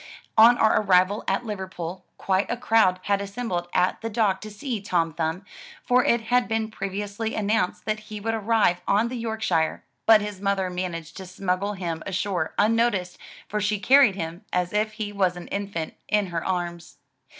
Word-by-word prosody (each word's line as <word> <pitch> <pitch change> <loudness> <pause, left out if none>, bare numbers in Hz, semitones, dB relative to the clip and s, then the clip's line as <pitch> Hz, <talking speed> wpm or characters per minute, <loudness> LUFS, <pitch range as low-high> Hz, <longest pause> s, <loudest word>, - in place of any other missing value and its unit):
On 230 +2 +7
our 220 0 +4
arrival 190 +1 +3
at 195 +5 0
Liverpool, 185 -4 -5
quite 190 +1 0
a 240 - -1
crowd 225 -6 +3
had 200 0 +1
assembled 200 -4 -3
at 180 +1 +1
the 225 - -3
dock 210 -4 +1
to 215 - -7
see 220 +1 -4
Tom 170 -5 0
Thumb, 165 +4 -2 0.4
for 250 0 +4
it 235 -1 +2
had 245 +2 +1
been 225 -1 -1
previously 205 +2 -4
announced 210 -3 0
that 215 0 -1
he 210 -1 -6
would 225 +2 -2
arrive 220 -5 +2
on 215 +4 +2
the 240 -2 -5
Yorkshire^ 220 -8 0 0.3
but 220 -1 +8
his 205 -2 -6
mother 195 -2 0
managed 170 -3 -5
to 190 -1 -8
smuggle 185 +2 -2
him 170 -4 -4
ashore 190 0 -2
unnoticed, 215 -4 +1 0.3
for 210 0 -2
she 210 +1 +1
carried 260 -1 +5
him, 170 +1 -5
as 180 +1 -1
if 215 +1 0
he 210 -1 -5
was 185 -3 +1
an 175 - -8
infant, 200 -5 -4
in 210 -1 +2
her 165 - -1
arms. 175 -4 -4
200 Hz, 180 wpm, -25 LUFS, 180-220 Hz, 0.4 s, but